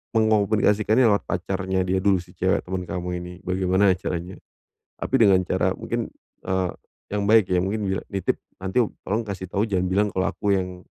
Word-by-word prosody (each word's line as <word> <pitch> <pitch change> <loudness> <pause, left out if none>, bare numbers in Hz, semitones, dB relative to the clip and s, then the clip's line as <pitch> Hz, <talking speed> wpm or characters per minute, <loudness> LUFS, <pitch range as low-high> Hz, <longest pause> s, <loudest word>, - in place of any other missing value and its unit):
mengkomunikasikan 110 0 +3
lewat 110 -5 +4
pacarnya 95 -1 -1
dia 95 +1 +1
dulu, 100 -1 +3
si - - -17
cewek - - +1
temen 90 0 -3
kamu 90 -1 -4
ini, 90 0 -8
bagaimana 95 +1 +3
caranya? 90 +1 -4 0.7
Tapi - - -4
dengan 95 -4 +6
cara - - 0
mungkin, - - -3 0.4
eee, 95 -1 0 0.4
yang 100 -1 0
baik 110 -3 +5
ya, 90 - +3
mungkin 100 -1 -1
nitip 95 -2 -1 0.2
nanti 95 +5 -1 0.3
"Tolong 110 +4 0
kasih 95 -3 -6
tahu, 100 +3 0
jangan 95 -4 0
bilang 100 +3 +2
kalau 95 +1 +1
aku 100 +2 0
yang 90 -1 -3
95 Hz, 170 wpm, -24 LUFS, 90-105 Hz, 0.7 s, dengan